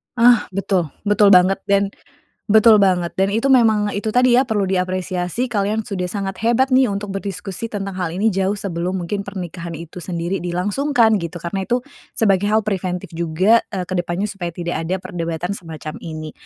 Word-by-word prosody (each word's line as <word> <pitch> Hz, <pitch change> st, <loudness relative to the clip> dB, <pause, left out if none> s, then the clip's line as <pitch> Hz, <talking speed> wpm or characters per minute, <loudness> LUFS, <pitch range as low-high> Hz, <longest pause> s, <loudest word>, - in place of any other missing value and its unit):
Ah! 240 Hz, -2 st, +5 dB
Betul, 190 Hz, -4 st, 0 dB, 0.2 s
betul 205 Hz, 0 st, +4 dB
banget, 185 Hz, +2 st, +5 dB
dan 200 Hz, 0 st, +2 dB, 0.6 s
betul 220 Hz, +1 st, +7 dB
banget. 185 Hz, -4 st, +2 dB
Dan 195 Hz, +1 st, +1 dB
itu 230 Hz, +6 st, +1 dB
memang 220 Hz, -5 st, +4 dB
itu 215 Hz, +2 st, -2 dB
tadi 250 Hz, 0 st, +4 dB
ya, 260 Hz, -, +4 dB
perlu 215 Hz, -5 st, 0 dB
diapresiasi 185 Hz, +4 st, -1 dB
kalian 210 Hz, -1 st, 0 dB
sudah 195 Hz, -4 st, -3 dB
sangat 195 Hz, 0 st, -4 dB
hebat 240 Hz, +3 st, +3 dB
nih 260 Hz, 0 st, +5 dB
untuk 200 Hz, 0 st, -4 dB
berdiskusi 195 Hz, +2 st, -5 dB
tentang 195 Hz, -2 st, -4 dB
hal 180 Hz, -3 st, -2 dB
ini 200 Hz, +6 st, +1 dB
jauh 190 Hz, +1 st, 0 dB
sebelum 185 Hz, -1 st, -3 dB
mungkin 200 Hz, +4 st, -3 dB
pernikahan 175 Hz, -3 st, -6 dB
itu 170 Hz, +2 st, -9 dB
sendiri 175 Hz, +2 st, -3 dB
dilangsungkan 220 Hz, +7 st, +2 dB
gitu, 170 Hz, 0 st, -6 dB
karena 190 Hz, +3 st, -3 dB
itu 245 Hz, +5 st, 0 dB, 0.4 s
sebagai 200 Hz, -3 st, +2 dB
hal 215 Hz, +1 st, +3 dB
preventif 185 Hz, -2 st, -3 dB
juga, 170 Hz, +7 st, +3 dB
eee, 190 Hz, -3 st, -2 dB
ke 185 Hz, -, -3 dB
depannya 175 Hz, +3 st, -1 dB
supaya 180 Hz, -4 st, -5 dB
tidak 170 Hz, +1 st, -4 dB
ada 180 Hz, +3 st, -1 dB
perdebatan 175 Hz, -1 st, -4 dB
semacam 160 Hz, -3 st, -8 dB
ini. 155 Hz, -1 st, -6 dB
195 Hz, 175 wpm, -20 LUFS, 175-210 Hz, 0.6 s, betul